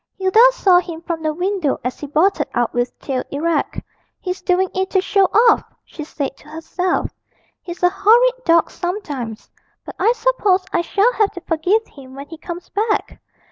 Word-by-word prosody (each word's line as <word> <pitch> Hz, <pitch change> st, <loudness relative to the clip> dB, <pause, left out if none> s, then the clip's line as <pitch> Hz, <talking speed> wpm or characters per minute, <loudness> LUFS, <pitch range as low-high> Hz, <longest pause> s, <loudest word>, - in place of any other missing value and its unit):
Hilda 380 Hz, +3 st, +2 dB
saw 375 Hz, -7 st, +4 dB
him 335 Hz, -2 st, -7 dB
from 335 Hz, -1 st, -4 dB
the 310 Hz, -1 st, 0 dB
window 360 Hz, -2 st, -1 dB
as 250 Hz, +1 st, -4 dB
he 290 Hz, -, -6 dB
bolted 315 Hz, +1 st, +1 dB
out 240 Hz, -1 st, 0 dB
with 245 Hz, 0 st, -2 dB
tail 260 Hz, -2 st, -3 dB
erect. 310 Hz, +2 st, -1 dB, 0.4 s
'He's 365 Hz, 0 st, -5 dB
doing 365 Hz, +1 st, +1 dB
it 380 Hz, 0 st, -1 dB
to 380 Hz, -, +2 dB
show 390 Hz, +1 st, +2 dB
off,' 460 Hz, +5 st, +3 dB
she 305 Hz, -, -9 dB
said 285 Hz, -2 st, -5 dB
to -, -, -19 dB
herself; 340 Hz, +4 st, -2 dB, 0.5 s
'he's 355 Hz, 0 st, -9 dB
a 355 Hz, -, +6 dB
horrid 485 Hz, +6 st, +3 dB
dog 335 Hz, -4 st, +3 dB
sometimes. 290 Hz, -, -5 dB, 0.4 s
But -, -, -8 dB
I 455 Hz, -, +4 dB
suppose 410 Hz, -8 st, +1 dB
I -, -, +2 dB
shall 410 Hz, +7 st, +1 dB
have 420 Hz, -4 st, +2 dB
to 355 Hz, -, -8 dB
forgive 360 Hz, +7 st, 0 dB
him 265 Hz, -2 st, -14 dB
when 280 Hz, +1 st, -8 dB
he 325 Hz, -1 st, -10 dB
comes 345 Hz, +1 st, -8 dB
back!' 425 Hz, +1 st, -2 dB
355 Hz, 180 wpm, -19 LUFS, 305-395 Hz, 0.5 s, a